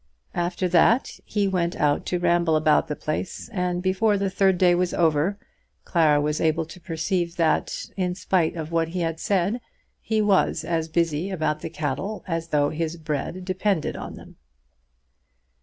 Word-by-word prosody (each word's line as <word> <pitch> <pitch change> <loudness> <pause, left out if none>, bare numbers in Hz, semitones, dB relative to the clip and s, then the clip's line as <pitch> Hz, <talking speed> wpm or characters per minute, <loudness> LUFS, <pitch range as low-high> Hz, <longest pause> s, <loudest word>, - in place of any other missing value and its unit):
After 175 +1 -1
that 180 +8 +3
he 205 -2 0
went 175 -3 0
out 145 -1 +1
to 180 - 0
ramble 170 -2 +2
about 155 -1 +3
the 150 - -3
place, 155 +10 -4
and 180 -4 -2
before 200 +3 +2
the 195 -1 -1
third 190 -1 +3
day 180 -1 +5
was 180 0 0
over 165 +3 +2 0.5
Clara 155 -4 +3
was 150 +1 -1
able 160 0 +1
to 170 +3 -12
perceive 170 0 -2
that, 165 -3 0
in 180 -2 -1
spite 180 -3 +1
of 160 -1 -5
what 165 -1 +1
he 175 +2 -3
had 165 -1 -2
said, 200 +6 0 0.4
he 220 -1 -1
was 205 -3 +2
as 165 -1 -1
busy 165 +1 0
about 155 -5 -1
the 165 - -5
cattle 160 +7 -3
as 165 -2 -2
though 145 -2 +1
his 160 +1 -3
bread 160 +3 -4
depended 185 -2 0
on - - -7
them. - - -14
175 Hz, 170 wpm, -24 LUFS, 160-185 Hz, 0.5 s, day